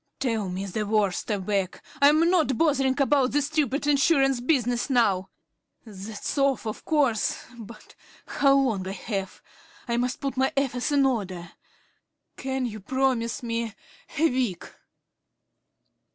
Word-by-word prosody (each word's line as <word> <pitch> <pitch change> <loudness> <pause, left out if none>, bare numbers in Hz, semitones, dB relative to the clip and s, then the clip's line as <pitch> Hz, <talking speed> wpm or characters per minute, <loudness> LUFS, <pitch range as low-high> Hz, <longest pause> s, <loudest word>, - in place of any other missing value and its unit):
"Tell 225 -7 -1
me 185 +2 -4
the 205 +3 -3
worst," 205 -3 0
I 210 - +1
begged. 195 -1 -2 0.2
"I'm 305 +4 +5
not 310 -9 +2
bothering 275 -4 +2
about 275 -2 +2
this 290 -1 +2
stupid 290 -2 -1
insurance 275 -3 +3
business 245 -2 0
now. 200 -7 +2 0.6
That's 210 +5 -5
off, 275 -3 +1
of 215 - -5
course. 275 -8 +1
But 215 0 -12 0.3
how 275 -1 +3
long 245 -9 +1
have 195 0 -5 0.5
I? 235 - -1
I - - +1
must 250 +1 -1
put 275 -2 -4
my 265 +1 +2
affairs 265 0 0
in 280 -1 +4
order. 185 -9 -2 0.8
Can 265 -1 -3
you 215 -3 -5
promise 255 +2 -1
me 230 -2 -3 0.4
a 325 +3 +4
week?" 245 - -1
245 Hz, 135 wpm, -26 LUFS, 210-275 Hz, 0.8 s, I'm